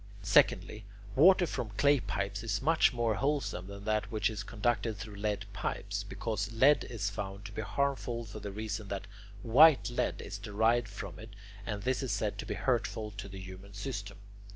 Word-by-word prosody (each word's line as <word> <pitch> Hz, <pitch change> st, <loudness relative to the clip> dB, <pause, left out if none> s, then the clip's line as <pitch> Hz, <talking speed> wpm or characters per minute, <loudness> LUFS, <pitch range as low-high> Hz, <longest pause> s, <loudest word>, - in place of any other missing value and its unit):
Secondly, 105 Hz, -, +3 dB, 0.3 s
water 180 Hz, +5 st, +7 dB
from 125 Hz, -8 st, -3 dB
clay 145 Hz, 0 st, +5 dB
pipes 100 Hz, -2 st, -3 dB
is 110 Hz, -3 st, -1 dB
much 160 Hz, +2 st, +4 dB
more 120 Hz, -3 st, +1 dB
wholesome 135 Hz, -7 st, -1 dB
than 100 Hz, 0 st, -9 dB
that 110 Hz, -1 st, 0 dB
which 110 Hz, 0 st, +1 dB
is 105 Hz, -3 st, -4 dB
conducted 115 Hz, +1 st, -1 dB
through 105 Hz, +1 st, -8 dB
lead 105 Hz, 0 st, -2 dB
pipes, -, -, -3 dB
because 110 Hz, -2 st, -3 dB
lead 135 Hz, +6 st, +5 dB
is 105 Hz, -4 st, -2 dB
found 100 Hz, 0 st, -6 dB
to 105 Hz, -, -7 dB
be 110 Hz, -, -4 dB
harmful 120 Hz, +1 st, -1 dB
for 105 Hz, 0 st, -8 dB
the 100 Hz, -1 st, -6 dB
reason 110 Hz, 0 st, -4 dB
that 100 Hz, 0 st, -4 dB, 0.4 s
white 135 Hz, +3 st, +6 dB
lead 120 Hz, -, -1 dB
is -, -, -6 dB
derived 110 Hz, +3 st, +2 dB
from 100 Hz, -3 st, -8 dB
it, 110 Hz, -, -9 dB, 0.4 s
and 105 Hz, -2 st, -3 dB
this 130 Hz, +2 st, 0 dB
is 130 Hz, -4 st, -2 dB
said 105 Hz, 0 st, -1 dB
to -, -, -5 dB
be -, -, -2 dB
hurtful 105 Hz, -1 st, -1 dB
to 100 Hz, 0 st, -7 dB
the 95 Hz, 0 st, -8 dB
human 95 Hz, +1 st, -10 dB
system. 100 Hz, -3 st, -5 dB
110 Hz, 185 wpm, -32 LUFS, 100-120 Hz, 0.4 s, water